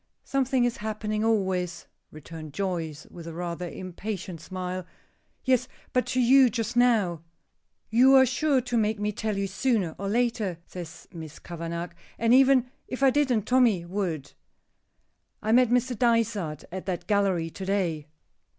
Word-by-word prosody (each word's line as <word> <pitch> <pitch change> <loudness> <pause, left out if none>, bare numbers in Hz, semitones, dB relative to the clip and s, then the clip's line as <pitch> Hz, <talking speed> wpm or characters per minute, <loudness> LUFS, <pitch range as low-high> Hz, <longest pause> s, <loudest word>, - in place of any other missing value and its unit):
"Something 265 -2 +1
is 240 - -1
happening 215 0 -3
always," 185 -5 0 0.2
returned 155 0 -10
Joyce, 170 -6 -3
with 170 -1 -10
a 165 - -7
rather 175 0 -4
impatient 185 -1 -6
smile. 185 0 -4 0.6
"Yes, 255 -1 +2 0.3
but 250 - +1
to 255 - 0
you 255 +1 +6
just 230 0 -3
now." 220 -9 +3 0.7
"You 255 +4 +6
are 265 0 +8
sure 270 +2 +1
to 245 -1 -2
make 215 -1 +1
me 210 0 0
tell 215 0 -3
you 200 - 0
sooner 195 -3 0
or 195 0 -2
later," 230 -5 0
says 170 -2 -9
Miss 160 -2 -8
Kavanagh, 170 0 -5 0.3
"and 230 +1 +3
even 260 -1 +5 0.2
if 255 +2 -4
I 270 - +6
didn't, 255 -6 +2
Tommy 235 -9 +3
would. 175 - -3 1.1
I 220 - -1
met 245 0 +5
Mr. 250 +1 +1
Dysart 220 - +1
at 185 +1 -6
that 180 -2 -3
gallery 195 -5 +1
to 195 - -8
day." 170 -7 -1
205 Hz, 150 wpm, -27 LUFS, 175-245 Hz, 1.1 s, are